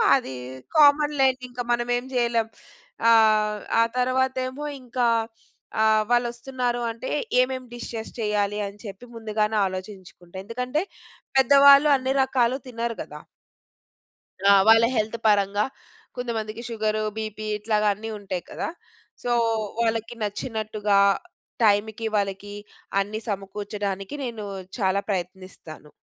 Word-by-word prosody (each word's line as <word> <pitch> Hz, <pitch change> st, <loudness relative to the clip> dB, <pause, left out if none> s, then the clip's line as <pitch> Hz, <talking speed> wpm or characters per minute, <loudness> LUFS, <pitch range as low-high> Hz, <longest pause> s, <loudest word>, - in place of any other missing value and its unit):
అది 255 Hz, -, -3 dB, 0.4 s
కామన్ 295 Hz, 0 st, +6 dB
లేండి. 260 Hz, -1 st, +3 dB
ఇంక 245 Hz, -, -13 dB
మనమేం 245 Hz, +1 st, 0 dB
చేయలేం. 235 Hz, -2 st, +1 dB, 0.6 s
ఆహ్, 215 Hz, -2 st, +4 dB, 0.2 s
ఆ -, -, +6 dB
తరువాతేమో 260 Hz, +2 st, 0 dB, 0.2 s
ఇంక 250 Hz, 0 st, -13 dB, 0.8 s
ఆహ్, 220 Hz, 0 st, +4 dB
వాళ్ళోస్తున్నారు 240 Hz, 0 st, 0 dB
అంటే 230 Hz, +3 st, -7 dB, 0.3 s
ఏమేం 255 Hz, 0 st, -2 dB
డిషెస్ 235 Hz, -2 st, -6 dB
చెయ్యాలి. 210 Hz, -1 st, 0 dB
అని 200 Hz, +1 st, -11 dB
చెప్పి 200 Hz, +4 st, -9 dB
ముందుగానే 215 Hz, -1 st, -1 dB
ఆలోచించుకుంటా. 185 Hz, -2 st, -9 dB
ఎందుకంటే 250 Hz, +8 st, -2 dB, 0.6 s
పెద్దవాళ్ళు 280 Hz, +2 st, +7 dB
అన్ని 260 Hz, 0 st, -2 dB
రకాలు 255 Hz, -1 st, +1 dB
తినరు 235 Hz, -1 st, -3 dB
గదా! -, -, -9 dB, 1.3 s
ఆ! -, -, +9 dB, 0.2 s
వాళ్ళ 225 Hz, +1 st, +7 dB
హెల్త్ 220 Hz, +2 st, -1 dB
పరంగా 205 Hz, 0 st, +3 dB, 0.5 s
కొంతమందికి 230 Hz, -2 st, -4 dB
షుగరు, 215 Hz, -1 st, -1 dB, 0.2 s
బీపీ 215 Hz, 0 st, -5 dB
ఇట్లాగా 210 Hz, 0 st, 0 dB
అన్నీ 220 Hz, +3 st, -7 dB
ఉంటాయి 190 Hz, -3 st, -4 dB
కదా! -, -, -4 dB, 0.6 s
సో, 245 Hz, -, -1 dB, 0.5 s
వాళ్ళకి 225 Hz, +1 st, -1 dB
నచ్చినట్టుగా 210 Hz, -1 st, -1 dB, 0.7 s
టైంకి 215 Hz, +1 st, +2 dB
వాళ్ళకి 200 Hz, 0 st, -2 dB, 0.5 s
అన్ని 210 Hz, +2 st, -2 dB
సమకూర్చడానికి 200 Hz, +1 st, -4 dB
నేను 230 Hz, -4 st, -5 dB, 0.3 s
చాలా 195 Hz, -2 st, +1 dB
ప్రయత్నిస్తాను. 180 Hz, -5 st, -6 dB
220 Hz, 110 wpm, -24 LUFS, 205-245 Hz, 1.3 s, ఆ